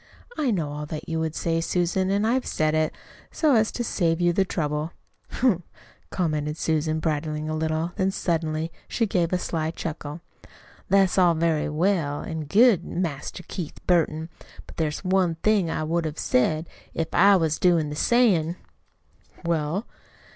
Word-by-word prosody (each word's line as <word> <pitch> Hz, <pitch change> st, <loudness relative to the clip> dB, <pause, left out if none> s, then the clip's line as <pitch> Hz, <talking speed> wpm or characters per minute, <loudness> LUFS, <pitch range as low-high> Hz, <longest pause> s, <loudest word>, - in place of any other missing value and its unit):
I 295 Hz, -4 st, 0 dB
know 165 Hz, -9 st, -1 dB
all 150 Hz, 0 st, -5 dB
that 155 Hz, 0 st, -6 dB
you 160 Hz, -1 st, -2 dB
would 160 Hz, -1 st, -2 dB
say, 165 Hz, -1 st, 0 dB
Susan, 180 Hz, +2 st, 0 dB
and 200 Hz, +2 st, +1 dB
I've 250 Hz, +3 st, +1 dB
said 155 Hz, 0 st, +1 dB
it, 155 Hz, 0 st, +1 dB, 0.4 s
so 305 Hz, -3 st, +2 dB
as 220 Hz, -2 st, +3 dB
to 240 Hz, -, -2 dB
save 170 Hz, -7 st, 0 dB
you 175 Hz, -1 st, +3 dB
the 195 Hz, -, +3 dB
trouble." 150 Hz, -3 st, -2 dB, 0.4 s
"Humph!" 235 Hz, -9 st, +1 dB, 0.5 s
commented 155 Hz, -4 st, -1 dB
Susan, 155 Hz, -1 st, 0 dB
bridling 155 Hz, -1 st, -2 dB
a 155 Hz, -, -2 dB
little; 160 Hz, +2 st, -1 dB
then 190 Hz, 0 st, +2 dB
suddenly, 165 Hz, -3 st, -1 dB, 0.2 s
she 230 Hz, -, 0 dB
gave 175 Hz, -5 st, 0 dB
a 180 Hz, -, +2 dB
sly 160 Hz, -3 st, -2 dB
chuckle. 160 Hz, -1 st, -6 dB, 0.7 s
"That's 195 Hz, -1 st, +4 dB
all 175 Hz, -2 st, +5 dB
very 160 Hz, -2 st, +1 dB
well 155 Hz, -2 st, 0 dB
an' 160 Hz, -2 st, -4 dB
good, 205 Hz, -, +5 dB
Master 170 Hz, 0 st, -4 dB
Keith 170 Hz, -6 st, -6 dB
Burton, 160 Hz, -2 st, +1 dB, 0.4 s
but -, -, -14 dB
there's 155 Hz, 0 st, -2 dB
one 185 Hz, -1 st, +3 dB
more -, -, -13 dB
thing 210 Hz, -5 st, +3 dB
I 155 Hz, -, -2 dB
would 165 Hz, +2 st, 0 dB
have 155 Hz, 0 st, -4 dB
said 155 Hz, +6 st, +1 dB, 0.3 s
if 165 Hz, -1 st, -2 dB
I 200 Hz, 0 st, +6 dB
was 160 Hz, -4 st, +1 dB
doin' 165 Hz, -4 st, +3 dB
the -, -, -4 dB
sayin'!" 180 Hz, -5 st, +3 dB, 0.9 s
"Well?" 170 Hz, +5 st, 0 dB
165 Hz, 170 wpm, -25 LUFS, 155-185 Hz, 0.9 s, I